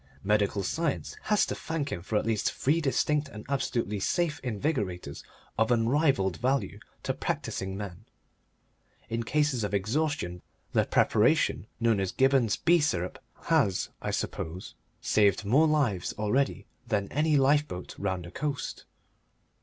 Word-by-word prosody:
Medical 100 0 +1
science 160 - -2
has 210 -1 +3
to - - -3
thank 155 -3 -3
him 85 - -3
for 105 +4 -1
at - - 0
least 110 -2 +1
three 155 +5 +1
distinct 150 +1 +1
and 105 -4 -10
absolutely 120 -6 -1
safe 160 - 0
invigorators 110 - -2 0.4
of 110 - +3
unrivalled 120 - +2
value 125 -4 0 0.2
to - - 0
practising 95 0 -3
men. 100 0 -7 1.1
In 115 +1 0
cases 135 -1 +1
of 105 0 -1
exhaustion 110 - -1 0.3
the - - +3
preparation - - +2
known 115 -3 +2
as 95 -1 -1
Gibberne's 135 -4 +3
B 170 +1 +4
Syrup 90 - -1 0.2
has, 95 -2 +2
I - - -3
suppose, 85 +4 -4 0.3
saved 105 -1 +3
more 140 +10 +4
lives 130 - +1
already 110 +7 0 0.2
than 100 -3 0
any 150 +2 +2
lifeboat 140 -8 +1
round 95 -3 -2
the 85 - -9
coast. 145 +3 -4
115 Hz, 140 wpm, -28 LUFS, 100-145 Hz, 1.1 s, B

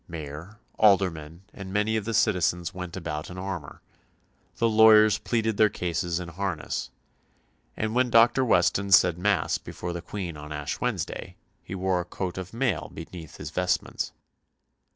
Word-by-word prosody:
Mayor, 80 +4 -8 0.2
aldermen, 90 -5 +2
and 95 -1 -8
many 105 +2 +1
of 110 -2 -1
the 115 0 -2
citizens 90 -5 +1
went 90 0 -6
about 75 -4 -5
in 90 - -9
armour, 95 -6 -6 0.7
"the 115 - +2
lawyers 110 -1 +6
pleaded 110 -3 -1
their 110 -1 +5
causes 85 -1 -2
in 90 -1 -6
harness," 90 -1 -3 0.9
and 110 0 -1
when 125 0 +2
Dr. 120 +3 +5
Weston 100 -3 +2
said 90 -2 +6
Mass 100 -2 +1
before 85 0 -6
the 85 - -5
Queen 90 -3 -6
on 75 +1 -9
Ash 75 -1 -4
Wednesday - - -3 0.3
he 95 - -7
wore 95 -1 0
a - - -8
coat 95 0 -4
of 95 0 -7
mail 115 -7 -1
beneath 80 -1 -9
his - - -7
vestments. - - -1
95 Hz, 155 wpm, -26 LUFS, 85-110 Hz, 0.9 s, lawyers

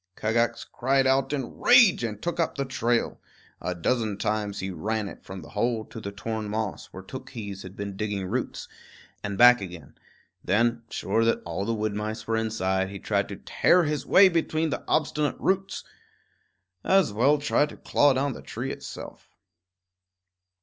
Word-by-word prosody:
Kagax 115 +2 0
cried 135 +2 +1
out 135 +1 +2
in 135 -4 -4
rage 240 - +6
and 105 -3 -3
took 175 +7 -3
up 165 - 0
the 140 - -2
trail. 120 -2 -1 0.4
A 90 - -2
dozen 110 +3 0
times 105 -1 -1
he 95 0 -3
ran 105 +5 -2
it - - -10
from 95 -1 -8
the - - -12
hole 110 +1 -1
to 115 - -9
the 100 - -5
torn 110 +1 -4
moss, 110 -1 -3
where 95 - -10
Tookhees 110 -4 -7
had 95 0 -10
been 100 -1 -5
digging 100 -2 -2
roots, 120 +7 -3 0.6
and 100 -1 -3
back 125 -1 +8
again; 85 -7 -9 0.5
then, 115 +4 +2
sure 115 - 0
that 115 - +1
all 85 +4 -3
the 115 +1 0
wood 105 -1 -1
mice 105 +1 -4
were 115 - 0
inside, 95 -4 0
he 100 - -7
tried - - -1
to - - -5
tear 180 0 +3
his 150 -2 -1
way 195 +1 +7
between 160 -2 0
the - - -3
obstinate 150 -1 +1
roots. 190 0 0 1.0
As 190 - +3
well 135 +8 +4
try 145 +1 +2
to - - -12
claw 145 -1 +3
down 135 +1 0
the - - -9
tree - - -5
itself. - - -9
115 Hz, 175 wpm, -26 LUFS, 100-135 Hz, 1.0 s, back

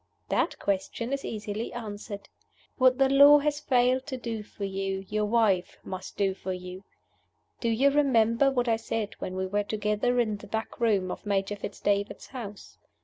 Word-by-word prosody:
"That - - +1
question 200 +6 -2
is 275 - -2
easily 210 +1 -4
answered. 205 -3 -7 0.5
What 255 0 +5
the 270 -1 +4
Law 285 +2 +8
has 290 0 0
failed 255 -2 +2
to 265 -3 -4
do 230 -3 -4
for 205 -1 -9
you, 195 0 -3
your 210 0 0
Wife 210 -5 +2
must 185 -1 -7
do 195 -1 +2
for 190 0 -5
you. 180 +1 -8 0.8
Do 235 - 0
you 265 +5 +3
remember 265 -3 +3
what 250 -2 0
I 225 -1 +3
said 225 -1 -3
when 185 - -4
we 190 0 -1
were 205 +2 0
together 210 +4 0
in 215 -3 +1
the - - -12
back 220 +2 -4
room 200 -6 +2
at - - -7
Major 200 0 0
Fitz 205 0 -7
David's 205 0 -1
house? 210 -6 -9
215 Hz, 180 wpm, -28 LUFS, 200-245 Hz, 0.8 s, Law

